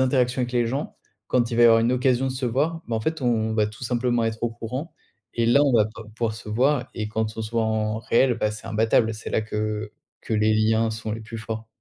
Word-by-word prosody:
interactions 130 -1 +2
avec 125 0 -3
les 120 -1 +2
gens, 135 +6 -3 0.3
quand 120 -2 +1
il 115 - -2
va 120 - +5
y - - +8
avoir 115 -1 +6
une 115 +2 +2
occasion 130 0 +2
de 130 - -1
se 130 0 -4
voir, 155 +8 0
bah 115 - 0
en - - -2
fait, 160 +5 -2
on 110 -3 +1
va 105 -1 +2
tout 105 +4 -8
simplement 120 0 0
être 110 0 -3
au 120 - +1
courant 125 +8 -6 0.4
et 115 -1 +1
là 140 +5 +5
on 140 - +2
va 110 -3 +4
pa 110 +1 -10
pouvoir 115 -1 -1
se 110 - -10
voir 130 +3 +1
et 105 -2 -3
quand 110 0 -2
on - - -1
se 110 - -6
voit 115 -1 +1
en 110 0 0
réel, 120 +2 +2
bah 105 -2 0
c'est 110 +1 -8
imbattable, 110 +1 +2
c'est 110 - -7
là - - +1
que 105 0 -3 0.3
que 110 - -3
les 110 0 +3
liens 110 +1 +2
sont 110 0 -5
les 115 - -5
plus 115 +1 -7
forts. 110 0 -6
115 Hz, 265 wpm, -24 LUFS, 110-125 Hz, 0.4 s, y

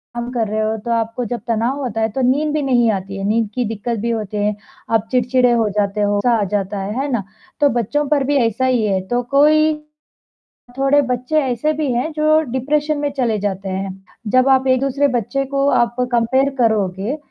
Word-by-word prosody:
काम 240 0 -4
कर 235 -3 -1
रहे 215 +1 -1
हो, 215 0 0
तो 225 +2 -5
आपको 230 +1 -1
जब 240 +2 -3
तनाव 235 +4 0
होता 225 -3 -3
है 220 - +1
तो 265 - -2
नींद 300 +2 0
भी 305 - 0
नहीं 245 -4 +3
आती 195 -1 -4
है, 195 - -5
नींद 220 0 +1
की 250 - 0
दिक्कत 225 +1 -3
भी 230 +3 -2
होती 215 -2 -3
है, 210 0 0 0.4
आप 225 -1 +1
चिड़चिड़े 250 0 +2
हो 230 -2 +2
जाते 205 0 -1
हो, 205 0 +1
गुस्सा 235 +4 +2
आ - - +2
जाता 200 0 -1
है, 195 +2 -4
है 280 - -2
ना? 235 -5 -1 0.4
तो 290 - +5
बच्चों 240 +5 -1
पर 290 -2 +2
भी 290 - +1
ऐसा 230 +4 -1
ही 250 -3 +2
है, 195 -2 +1
तो 245 +3 0
कोई 310 +2 +4 1.0
थोड़े 275 +2 +3
बच्चे 255 +3 0
ऐसे 260 +4 0
भी 300 -3 -1
हैं 250 +7 -1
जो 310 0 +3
डिप्रेशन 295 +4 0
में 290 0 -1
चले 235 -4 +1
जाते 195 -1 -3
हैं, 190 0 -3 0.3
जब 255 +4 +3
आप 265 0 +3
एक-दूसरे 275 +2 +2
बच्चे 275 +5 -2
को 275 +1 0
आप 240 -2 +2 0.2
कम्पेयर 260 +4 +2
करोगे 215 +2 0
240 Hz, 210 wpm, -19 LUFS, 215-275 Hz, 1.0 s, तो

